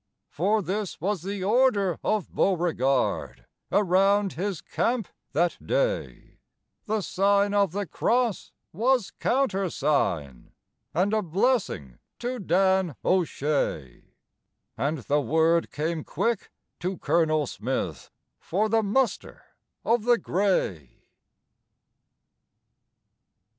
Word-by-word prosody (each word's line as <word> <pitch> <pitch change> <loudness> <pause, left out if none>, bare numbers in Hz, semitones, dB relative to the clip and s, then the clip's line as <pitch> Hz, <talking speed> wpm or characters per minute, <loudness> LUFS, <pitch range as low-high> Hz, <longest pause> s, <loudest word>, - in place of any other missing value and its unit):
For 205 +7 +1
this 200 +2 -3
was 195 -1 -1
the 195 +1 -4
order 205 -4 +2
of 215 -4 -1
Beauregard 165 -8 0 0.3
Around 195 +1 +3
his 190 -1 -3
camp 235 -4 -1 0.3
that 170 +4 +1
day - - -2 0.5
The 215 0 0
Sign 200 +2 +2
of 200 -4 +3
the 200 +2 -2
Cross 235 +2 0 0.2
was 240 +3 +1
countersign, 150 - 0 0.4
(And 185 +6 +1
a 215 - +2
blessing 180 - -1 0.2
to 245 +1 -4
Dan 190 - +2
O'Shea) 145 - -1 0.6
And 150 +3 -1
the 145 +3 0
word 160 +5 +2
came 155 +1 -3
quick 235 0 -2 0.3
to 185 +1 -3
Colonel 155 -3 +2
Smith 105 - -4 0.3
For 210 +5 -1
the 225 +1 +3
muster 235 +5 -1 0.4
of 230 -1 +2
the 240 -1 +5
grey. 175 - -1
190 Hz, 100 wpm, -26 LUFS, 160-210 Hz, 0.6 s, the